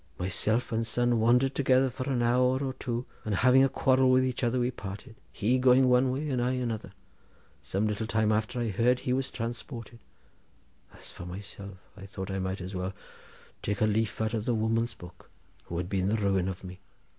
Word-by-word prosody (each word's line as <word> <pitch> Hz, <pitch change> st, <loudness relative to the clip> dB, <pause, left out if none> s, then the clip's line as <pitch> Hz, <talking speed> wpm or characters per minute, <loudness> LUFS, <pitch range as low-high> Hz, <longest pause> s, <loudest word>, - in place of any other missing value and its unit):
Myself 110 Hz, -, 0 dB
and 115 Hz, 0 st, -1 dB
son 120 Hz, 0 st, +1 dB
wandered 125 Hz, +4 st, +3 dB
together 130 Hz, -1 st, +3 dB
for 130 Hz, +2 st, -5 dB
an 125 Hz, -3 st, +1 dB
hour 125 Hz, +2 st, +3 dB
or 130 Hz, -1 st, -2 dB
two, 120 Hz, -1 st, -4 dB, 0.2 s
then, 105 Hz, -, -2 dB
having 130 Hz, +6 st, +5 dB
a 135 Hz, -, +4 dB
quarrel 130 Hz, 0 st, +3 dB
with 130 Hz, 0 st, +4 dB
each 130 Hz, 0 st, -3 dB
other, 120 Hz, +1 st, +1 dB
we 125 Hz, +1 st, +1 dB
parted, 105 Hz, +1 st, -8 dB, 0.2 s
he 120 Hz, +5 st, +1 dB
going 130 Hz, +1 st, +5 dB
one 125 Hz, +1 st, +4 dB
way 140 Hz, +4 st, -2 dB
and 125 Hz, -2 st, 0 dB
I 125 Hz, +1 st, +1 dB
another. 115 Hz, -6 st, -3 dB, 0.7 s
Some 100 Hz, +3 st, -1 dB
little 105 Hz, +1 st, -2 dB
time 110 Hz, -1 st, +1 dB
after 110 Hz, +3 st, -1 dB
I 120 Hz, -2 st, -1 dB
heard 120 Hz, +5 st, +2 dB
that -, -, -12 dB
he 125 Hz, -, 0 dB
was 130 Hz, 0 st, -1 dB
transported. 115 Hz, 0 st, -6 dB, 0.9 s
As -, -, -11 dB
for 90 Hz, -, -9 dB
myself, 100 Hz, +1 st, -9 dB, 0.2 s
I 100 Hz, -1 st, -10 dB
thought 95 Hz, 0 st, -6 dB
I 95 Hz, -, -2 dB
might 95 Hz, +1 st, -3 dB
as 90 Hz, +2 st, -6 dB
well 95 Hz, +1 st, -3 dB, 0.7 s
take 100 Hz, 0 st, -2 dB
a 110 Hz, -, +4 dB
leaf 110 Hz, +1 st, 0 dB
out 110 Hz, 0 st, -1 dB
of 110 Hz, -1 st, -2 dB
the 120 Hz, -2 st, +1 dB
woman's 115 Hz, +2 st, 0 dB
book, 90 Hz, 0 st, -14 dB, 0.4 s
who 85 Hz, -, -5 dB
had 90 Hz, 0 st, -2 dB
been 95 Hz, 0 st, 0 dB
the 110 Hz, -, +2 dB
ruin 100 Hz, -4 st, +1 dB
of 95 Hz, 0 st, -7 dB
me. 90 Hz, 0 st, -9 dB
115 Hz, 210 wpm, -29 LUFS, 100-125 Hz, 0.9 s, having